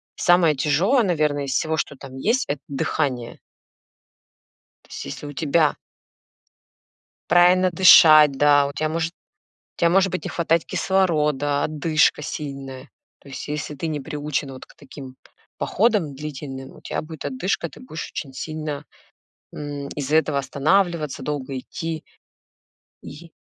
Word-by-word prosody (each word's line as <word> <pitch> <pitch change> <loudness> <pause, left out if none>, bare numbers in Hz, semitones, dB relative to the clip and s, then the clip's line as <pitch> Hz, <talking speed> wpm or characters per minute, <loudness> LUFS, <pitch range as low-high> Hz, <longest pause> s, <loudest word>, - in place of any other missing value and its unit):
самое 175 -4 +4
тяжёлое, 175 - +2
наверное, 150 -6 0
из 135 - -4
всего, 160 0 0
что 140 - -3
там 135 -1 -11
есть,- 230 - +1
это 145 -1 -3
дыхание. 135 -3 -2 1.4
То - - -26
есть - - -7
если 70 - -7
у 145 - -8
тебя 155 +1 +2 1.5
Правильно 180 +1 +5
дышать, 155 -4 +8
да, 145 0 +4
у 140 - -7
тебя 155 +2 -1
может 165 +1 -2 0.7
у - - -12
тебя 170 - +4
может 190 +1 +3
быть 185 - -3
не - - -3
хватать 165 -1 0
кислорода, 150 -7 +1
одышка 155 0 +2
сильная. 135 -3 -7 0.3
То - - -18
есть, 135 - -7
если 150 0 -4
ты 145 - -4
не 155 -2 -2
приучен 145 -1 -4
вот 130 - -11
к - - -20
таким 135 -2 -11
п - - -46 0.4
походам 200 - +1
длительным, 135 -2 -8
у - - -15
тебя - - -4
будет 160 -1 -10
одышка, 195 -8 -2
ты - - -15
будешь 165 -11 -7
очень 140 -4 -6
сильно, 155 -1 -5 0.7
м, 145 -1 -6
из-за 145 +1 -1
этого 155 -3 +1
останавливаться, 150 +1 0
долго 135 -2 -4
идти. 160 +4 -5 1.0
И 165 +3 -11
150 Hz, 145 wpm, -22 LUFS, 140-165 Hz, 1.5 s, дышать